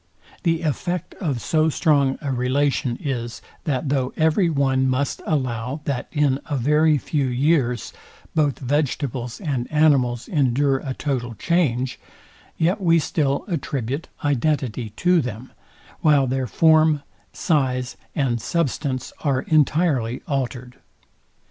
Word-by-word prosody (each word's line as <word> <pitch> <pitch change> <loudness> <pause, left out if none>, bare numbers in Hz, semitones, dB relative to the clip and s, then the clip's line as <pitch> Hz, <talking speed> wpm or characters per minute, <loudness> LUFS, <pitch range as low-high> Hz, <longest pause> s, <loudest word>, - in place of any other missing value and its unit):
The 165 -1 0
effect 170 +3 -2
of 145 -9 -1
so 155 +5 +2
strong 140 -3 +2
a 140 - -1
relation 130 0 0
is, 120 -5 -4 0.3
that 140 -1 -1
though 135 -2 0
every 160 +3 +3
one 135 -3 +2
must 130 +2 -1
allow, 130 -2 -1
that 130 -3 -2
in 145 -3 +2
a 145 -3 -1
very 150 +4 +3
few 140 -1 -1
years 130 -1 +1 0.4
both 145 -5 +1
vegetables 130 -3 -2
and 135 -9 -3
animals 135 -6 +3
endure 140 -2 +2
a 130 -1 -5
total 125 -5 -3
change, 130 - 0 0.6
yet 180 +6 +1
we 170 -2 +4
still 145 -3 0
attribute 140 - -3 0.2
identity 130 -4 0
to 180 +3 +3
them, 125 0 -6 0.5
while 145 -3 +4
their 130 0 -1
form, 155 +3 +4 0.3
size, 130 -6 0 0.2
and 125 -5 0
substance 140 -4 -2
are 135 -3 +1
entirely 150 -6 +1
altered. 125 -3 -3
140 Hz, 125 wpm, -22 LUFS, 125-155 Hz, 0.6 s, we